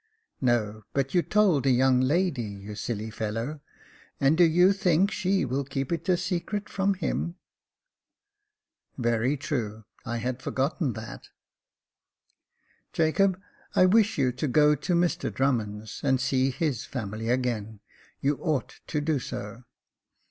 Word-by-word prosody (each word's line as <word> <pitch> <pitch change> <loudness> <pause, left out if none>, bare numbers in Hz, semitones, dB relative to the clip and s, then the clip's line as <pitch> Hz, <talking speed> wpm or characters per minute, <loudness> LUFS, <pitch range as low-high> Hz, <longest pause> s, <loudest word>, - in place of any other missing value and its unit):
"No; 110 -4 +1
but 135 -1 -1
you 175 - +4
told 190 -9 +3
the 135 - +2
young 130 0 +4
lady, 150 +1 +1
you 100 -1 -7
silly 110 0 -4
fellow; 115 +7 -3 0.6
and 140 +3 +4
do 175 - +5
you 180 +4 +5
think 190 0 +2
she 190 -3 +1
will 135 +2 -1
keep 135 +1 -4
it 170 +2 -2
a 180 - +4
secret 190 +4 -2
from 195 0 0
him? 170 -1 -2 0.9
" 415 +1 -59
Very 120 +3 +1
true; 110 -6 -3 0.2
I 120 -2 -3
had 125 +2 -3
forgotten 135 +1 -1
that." 110 +1 -9 1.2
" - - -41
Jacob, 180 +4 +2 0.4
I 185 - +6
wish 215 +3 +4
you 130 -3 +2
to 130 +5 -3
go 150 +3 +5
to 170 +5 -1
Mr 175 0 +1
Drummond's, 110 -6 -1
and 135 -2 +2
see 130 0 +1
his 135 -3 -1
family 110 -2 -5
again; 115 -4 -1 0.4
you 140 +1 +1
ought 155 -6 -2
to 150 - -1
do 150 -1 0
so." 115 0 -7
135 Hz, 145 wpm, -27 LUFS, 120-170 Hz, 1.2 s, I